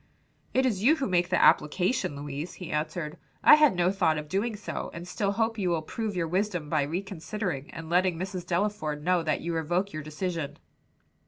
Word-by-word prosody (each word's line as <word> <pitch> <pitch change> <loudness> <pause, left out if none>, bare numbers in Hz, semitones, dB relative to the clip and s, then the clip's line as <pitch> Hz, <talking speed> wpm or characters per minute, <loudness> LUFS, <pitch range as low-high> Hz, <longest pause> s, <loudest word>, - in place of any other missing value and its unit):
"It 260 +1 +2
is 210 -7 0
you 280 +9 +5
who 275 - -2
make 180 -2 +1
the - - +2
application, 175 - +3
Louise," 145 +3 -5
he 180 - -7
answered. 155 0 -3 0.3
"I - - +9
had 300 -8 +6
no 175 +1 +3
thought 170 -6 +2
of 150 0 -5
doing 205 +7 -1
so, 205 - -5
and 170 +1 -7
still 200 +2 -1
hope 225 +1 0
you 185 -3 +1
will 165 -2 0
prove 215 +4 -4
your 170 -2 0
wisdom 180 -3 -1
by 155 -2 +2
reconsidering 175 0 -3
and 165 -1 -8
letting 180 0 +2
Mrs. 185 0 -4
Delaford 170 -5 -1
know 180 +1 +3
that 155 -2 -1
you 170 0 -3
revoke 175 +5 -1
your 155 - -4
decision." 155 0 -4
180 Hz, 195 wpm, -28 LUFS, 155-200 Hz, 0.3 s, I